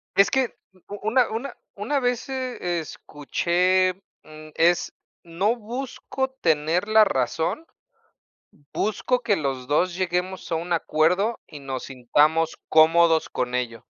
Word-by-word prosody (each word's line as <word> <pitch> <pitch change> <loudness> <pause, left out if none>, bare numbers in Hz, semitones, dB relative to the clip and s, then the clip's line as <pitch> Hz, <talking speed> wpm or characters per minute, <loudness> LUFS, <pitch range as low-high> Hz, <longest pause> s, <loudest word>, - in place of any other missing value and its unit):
Es 200 - +5
que 265 -3 +1 0.3
u 205 - -7
u - - -10
una 250 0 +3
una 230 +5 -4 0.2
una 230 +8 -1
vez, 245 0 -1
eh, 250 -10 -3
escuché, 180 +5 0 0.3
mm, 155 0 -13
es: 170 +2 +2 0.3
"No 185 +7 0
busco 260 +3 -4
tener 165 +4 +1
la 215 0 +6
razón" 165 - -1 1.1
"busco 245 +4 0
que 210 -3 +2
los 135 -6 -3
2 170 +5 +1
lleguemos 185 0 -2
a - - +1
un 170 +2 -2
acuerdo 175 +8 +1
y 150 - -10
nos 135 -2 -5
sintamos 150 +6 +1
cómodos 160 +1 +5
con 125 0 -3
ello". 115 -3 -3
175 Hz, 135 wpm, -24 LUFS, 155-215 Hz, 1.1 s, la